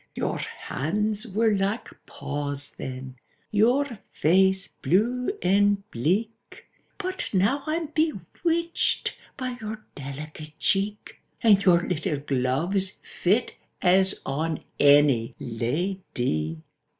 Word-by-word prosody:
—"Your - - -1
hands 210 - -2
were 220 +2 +2
like 200 +3 0 0.2
paws 145 0 -4
then, 130 0 -7 0.3
your 235 +3 +2
face 190 +3 +3
blue 225 +11 +1
and 200 +1 +3
bleak, 210 - -2 0.3
But 375 -1 -3
now 205 +10 +3
I'm 325 +2 0
bewitched 320 - 0 0.2
by 255 -2 -3
your 215 0 -6
delicate 150 +2 -8
cheek, 205 +2 -1 0.2
And 205 -3 +6
your 175 -2 +4
little 155 0 -1
gloves 145 +8 0
fit 210 +7 0 0.2
as 190 +1 +3
on 160 +3 -2 0.2
any 140 -5 +5
la 125 - -1 0.2
dy!" 80 -9 -1
190 Hz, 100 wpm, -26 LUFS, 145-220 Hz, 0.3 s, And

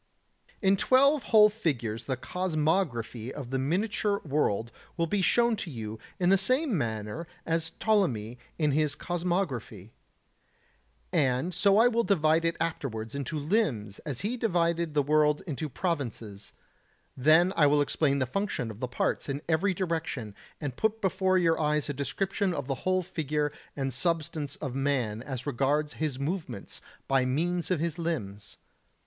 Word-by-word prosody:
77. 195 - 0
In 195 +1 +5
twelve 275 +6 +4
whole 215 -2 +7
figures 125 - -2
the 130 -2 -2
cosmography 155 - -1
of 135 -3 -7
the 135 - 0
miniature 200 +7 0
world 120 -6 0 0.3
will 170 - +2
be 195 +4 0
shown 235 +4 +3
to 185 - -5
you 110 -5 -6 0.2
in 175 -1 +3
the 195 0 +5
same 255 - +2
manner 110 +3 -3 0.2
as 165 0 -1
Ptolemy 125 - +1 0.2
in 150 -3 +2
his 150 +1 +1
cosmography. 165 - -3 1.2
And 135 +6 +1
so 200 +3 +4
I 230 +2 +7
will 235 -1 +2
divide 165 -5 +3
it 165 - 0
afterwards 130 -9 -3
into 140 +3 -3
limbs 145 - 0
as 135 -3 -5
he 235 +5 -2
divided 170 -7 0
the 145 - +3
world 150 +1 +3
into 155 -2 -4
provinces; 120 - -4 0.6
then 160 +7 +5
I 150 -3 +5
will 145 +1 +4
explain 145 0 +2
the 130 - +1
function 130 - -2
of 105 - -11
the 125 - -2
parts 125 - -1
in 140 +2 -3
every 175 +4 +2
direction, 160 - -3 0.3
and 145 -5 -4
put 220 +5 0
before 190 -1 +2
your 165 -3 +2
eyes 150 -1 +1
a - - -1
description 185 - -1
of 140 - -3
the 135 - -1 0.2
whole 185 0 +2
figure 150 -3 -1 0.2
and 135 -2 -2
substance 155 -3 -1
of 135 -5 -5
man 130 -6 0
as 130 -1 -6
regards 145 +2 0
his 150 -5 -1
movements 140 - -4 0.3
by 135 -1 +3
means 170 +7 0
of 180 -4 +1
his 170 +1 -2
limbs. 105 -13 -4
155 Hz, 160 wpm, -28 LUFS, 130-180 Hz, 1.2 s, whole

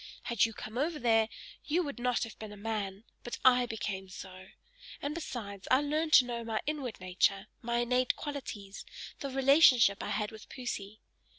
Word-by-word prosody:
Had 235 -2 +3
you 225 - -4
come 220 +3 -6
over 310 +3 0
there, 225 -4 +3 0.3
you 340 +4 +1
would 285 -5 -5
not 250 0 +1
have 230 - -8
been 215 -1 -7
a 210 - -10
man; 205 -2 -3 0.2
but 240 - -5
I 250 -1 +6
became 205 -4 -4
so! 185 0 -10 0.5
And 285 +1 -3
besides, 215 - -6
I 260 +2 +5
learned 310 +2 0
to 255 - +9
know 235 -1 -4
my 225 -1 -1
inward 285 -6 -3
nature, 185 +2 +1 0.2
my 235 0 -1
innate 250 +1 +2
qualities, 225 -9 -6 0.4
the 275 - -4
relationship 265 - +6
I - - -4
had 210 -1 -1
with 220 -1 -12
Poesy. 215 -5 -6
235 Hz, 180 wpm, -31 LUFS, 210-265 Hz, 0.5 s, to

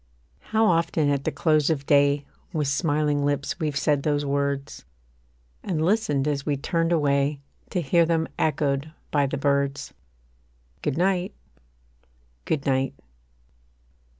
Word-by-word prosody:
How 220 0 +3
often 165 -5 +2
at 140 -1 -1
the - - +1
close 155 -2 +2
of 145 -3 -1
day 140 0 +3 0.3
With 150 -3 0
smiling 145 0 +1
lips 140 -1 -1
we've 150 -3 -1
said 145 0 +1
those 145 0 0
words: 140 0 -2 0.8
And 160 -4 -1
listened 170 -9 +1
as 140 -2 -1
we 145 -1 -1
turned 165 +4 0
away 140 -2 +1 0.3
To 180 - -1
hear 170 +4 +4
them 165 -1 +1
echoed 150 -1 0 0.2
by 145 -2 +2
the - - -3
birds, 140 0 0 0.9
Good 145 -1 -2
night 185 +2 0 1.1
Good 145 -3 -1
night. 135 -1 0
145 Hz, 130 wpm, -25 LUFS, 140-160 Hz, 1.1 s, hear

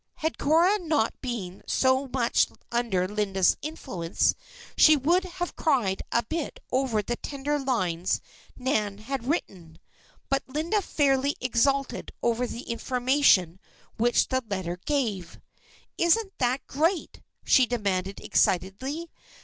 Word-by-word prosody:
Had 320 +1 -3
Cora 340 +8 +4
not 310 - 0
been 205 -8 -5
so 260 +1 +2
much 245 -2 +2 0.2
under 230 -7 0
Linda's 195 -2 +2
influence 220 - -1 0.4
she 310 - +7
would 340 +7 +2
have 355 -1 -5
cried 245 - +1
a 235 - +2
bit 320 +5 -4
over 250 -5 +1
the 240 +2 -3
tender 290 +1 -3
lines 185 -11 0 0.4
Nan 215 -6 -1
had 240 +3 -5
written. 180 - -3 0.5
But 275 0 +1
Linda 320 +10 0
fairly 280 -4 +1
exulted 265 +2 0
over 240 +1 +1
the 240 - -7
information 245 - +2 0.4
which 240 +2 +2
the 260 0 +1
letter 180 -3 -3
gave. 220 - -2 0.6
"Isn't 385 +4 +2
that 255 +1 0
great," 325 +5 -1 0.2
she 255 -2 +5
demanded 200 -5 -2
excitedly. 260 - 0
255 Hz, 120 wpm, -26 LUFS, 205-290 Hz, 0.6 s, she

